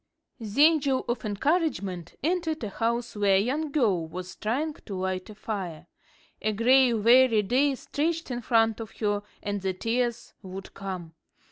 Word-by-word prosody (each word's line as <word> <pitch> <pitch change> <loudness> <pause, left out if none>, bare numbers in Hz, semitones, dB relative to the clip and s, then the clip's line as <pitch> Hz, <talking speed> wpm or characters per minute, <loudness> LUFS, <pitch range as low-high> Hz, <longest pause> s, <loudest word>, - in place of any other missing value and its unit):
The 225 +5 +2
Angel 285 -5 +3
of 240 +2 -2
Encouragement 205 - -1
entered 325 -3 0
a 215 - -2
house 235 +3 -2
where 200 -2 +3
a - - +5
young 285 +8 -1
girl 205 - +1
was 180 +3 -7
trying 280 +9 -1
to 205 -8 -9
light 185 +1 -3
a 215 - -10
fire. 180 -7 -5 0.6
A 215 - 0
gray, 250 +4 +5
weary 230 0 +5
day 265 +7 +2
stretched 325 +3 -2
in 245 0 -3
front 225 -1 +2
of 225 -2 -8
her, 205 -2 0 0.2
and 205 -1 -2
the 190 0 -1
tears 235 +4 -2
would 190 0 -9
come. 185 -4 -6
225 Hz, 160 wpm, -27 LUFS, 195-265 Hz, 0.6 s, a